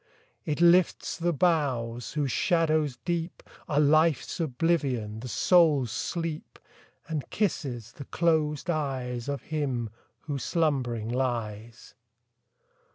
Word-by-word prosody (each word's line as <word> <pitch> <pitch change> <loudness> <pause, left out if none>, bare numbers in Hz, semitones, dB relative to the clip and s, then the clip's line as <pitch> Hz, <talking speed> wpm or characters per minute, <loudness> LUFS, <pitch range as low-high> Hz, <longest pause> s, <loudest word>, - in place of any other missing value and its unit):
It 150 -1 -2
lifts 175 +1 +4
the 175 0 0
boughs, 135 -8 0
whose 145 -4 -1
shadows 155 -5 +1
deep 170 0 -3 0.3
Are 145 - +2
Life's 155 +3 +3
oblivion, 135 -8 0
the 125 - -7
soul's 150 - +3
sleep, 165 +5 -4 0.5
And 155 -3 -4
kisses 130 - -2
the 140 - -10
closed 155 -3 0
eyes 130 -5 -3
Of 140 -1 -3
him, 130 -8 -2 0.3
who 145 -3 -4
slumbering 130 -9 0
lies. 115 -2 -3
145 Hz, 105 wpm, -28 LUFS, 125-165 Hz, 0.5 s, lifts